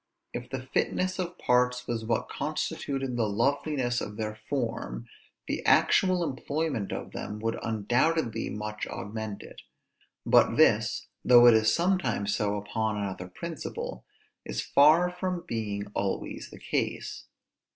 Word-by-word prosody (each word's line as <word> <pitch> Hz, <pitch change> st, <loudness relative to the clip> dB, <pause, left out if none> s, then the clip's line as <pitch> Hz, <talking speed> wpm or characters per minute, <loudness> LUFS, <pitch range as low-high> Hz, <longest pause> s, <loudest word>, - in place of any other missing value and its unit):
If 125 Hz, +1 st, -5 dB
the 130 Hz, -1 st, -4 dB
fitness 185 Hz, +8 st, -1 dB
of 180 Hz, -1 st, -3 dB
parts 125 Hz, 0 st, +2 dB
was 115 Hz, -2 st, -2 dB
what 115 Hz, 0 st, 0 dB
constituted 135 Hz, -3 st, -3 dB
the 115 Hz, -2 st, +2 dB
loveliness 130 Hz, +2 st, 0 dB
of 105 Hz, 0 st, -6 dB
their 110 Hz, -1 st, -2 dB, 0.2 s
form, 115 Hz, -, -2 dB, 0.4 s
the -, -, -3 dB
actual 185 Hz, -2 st, +4 dB
employment 140 Hz, -5 st, -2 dB
of -, -, -5 dB
them 105 Hz, -, -5 dB
would 115 Hz, 0 st, -1 dB
undoubtedly 115 Hz, +3 st, 0 dB
much 105 Hz, 0 st, -4 dB
augment 105 Hz, 0 st, -5 dB
it; -, -, -12 dB, 0.6 s
but -, -, +5 dB
this, -, -, +3 dB, 0.2 s
though 120 Hz, -1 st, +8 dB
it 120 Hz, -, +9 dB
is 110 Hz, 0 st, +4 dB
sometimes 130 Hz, -, +1 dB
so 105 Hz, -1 st, 0 dB
upon 110 Hz, +1 st, -2 dB
another 95 Hz, -3 st, -4 dB
principle, 160 Hz, -, -6 dB, 0.4 s
is -, -, -4 dB
far 160 Hz, +5 st, +5 dB
from 180 Hz, -1 st, -3 dB
being 105 Hz, -5 st, -3 dB
always 100 Hz, -1 st, -3 dB
the -, -, -12 dB
case. -, -, -3 dB
120 Hz, 135 wpm, -28 LUFS, 105-145 Hz, 0.6 s, it